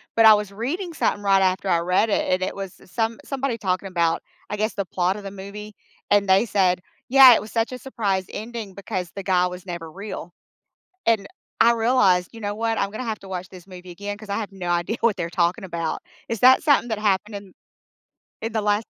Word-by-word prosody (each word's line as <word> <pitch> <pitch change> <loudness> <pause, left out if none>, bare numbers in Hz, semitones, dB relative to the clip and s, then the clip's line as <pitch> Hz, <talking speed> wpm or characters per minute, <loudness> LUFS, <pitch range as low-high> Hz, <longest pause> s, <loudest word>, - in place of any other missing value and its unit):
but 225 - +5
I 220 -1 +10
was 205 -1 -3
reading 325 - -4
something 205 -8 0
right 195 -1 +4
after 190 +1 +1
I 170 -2 +3
read 180 +6 +2
it, - - 0
and 185 0 +1
it - - -3
was 195 -2 -7
s 185 - -19
some 225 -1 -1
somebody 270 -3 -2
talking 190 -1 -1
about, 170 -3 0 0.3
I - - -1
guess, 215 +2 -1
the 200 -2 -2
plot 180 +2 0
of 205 - -9
the 195 - -6
movie, 205 +2 -9 0.4
and 200 -1 +4
they 195 +5 +5
said 185 -4 +2 0.3
Yeah, 265 -2 +10
it 215 - +2
was 215 - -10
such 230 +1 0
a 250 - -6
surprise 200 -8 -2
ending, 220 -2 -7
because 190 -3 -4
the 195 - -5
guy 180 -1 +2
was 180 +1 -8
never 170 -3 -6
real. 195 -2 -7 0.8
And, 220 -3 +3 0.4
I 235 +1 +6
realized, 225 -7 +3
"You 225 - -10
know 205 0 -3
what? 225 0 -1
I'm 200 - 0
gonna 215 +5 -6
have 220 -3 -3
to 195 - -13
watch 185 -1 -5
this 185 0 -13
movie 180 -1 -11
again, 205 +3 -5
'cause 215 -1 -13
I 200 - -1
had 210 -3 -4
no 185 -2 -7
idea 175 +6 0
what 230 -3 +3
they're 170 -3 -3
talking 175 +1 +1
about." 170 -3 -3 0.3
Is 230 - -3
that 260 +1 +7
something 285 -5 +3
that 220 - -1
happened 210 0 0
in 200 -2 -9 0.9
in 225 0 -4
the 220 -2 -1
last 210 +1 +1
200 Hz, 230 wpm, -23 LUFS, 185-225 Hz, 0.9 s, I